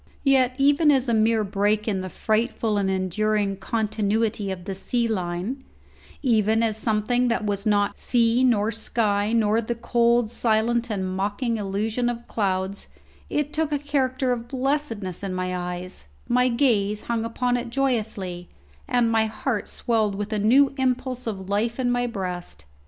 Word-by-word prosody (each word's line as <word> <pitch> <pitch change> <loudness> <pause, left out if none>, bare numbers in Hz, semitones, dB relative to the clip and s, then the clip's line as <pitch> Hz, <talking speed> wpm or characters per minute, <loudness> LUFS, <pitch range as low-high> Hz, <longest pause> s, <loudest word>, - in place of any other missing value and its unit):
Yet 260 -2 +3
even 290 +3 +4
as 265 -3 +3
a 235 - +1
mere 220 0 +3
break 205 +2 0
in 195 -3 0
the 185 - -5
frightful 220 +1 0
and 195 -1 0
enduring 195 +2 0
continuity 215 0 -1
of 185 -2 -5
the 195 - -3
sea 235 +5 -1
line 190 +5 -3 0.6
even 220 -3 +3
as 220 -2 +1
something 220 +3 +1
that 230 -2 0
was 205 +1 -1
not 205 -1 +1
sea 235 0 +2
nor 225 -4 +3
sky 210 -2 0
nor 225 -1 +2
the 235 +1 -3
cold 235 -1 +2
silent 235 +1 +1
and 195 -3 -2
mocking 205 +5 -1
illusion 215 +4 -1
of 235 0 -5
clouds 190 -2 -2 0.4
it 295 0 -1
took 310 -1 0
a 295 - +2
character 265 -3 0
of 240 -1 -3
blessedness 255 - -2
in 195 -2 -3
my 185 0 -2
eyes; 180 - -4 0.2
my 250 +1 +3
gaze 220 -5 +1
hung 230 -1 -1
upon 245 +2 0
it 240 -1 -3
joyously, 215 -9 -2 0.4
and 240 -2 +2
my 220 -1 +3
heart 220 0 -3
swelled 220 -4 0
with 205 +2 -4
a 215 - 0
new 265 +7 +4
impulse 255 -1 -1
of 190 -4 -4
life 225 +5 -1
in 245 -1 +1
my 245 0 +1
breast. 180 - -5
220 Hz, 165 wpm, -24 LUFS, 200-245 Hz, 0.6 s, even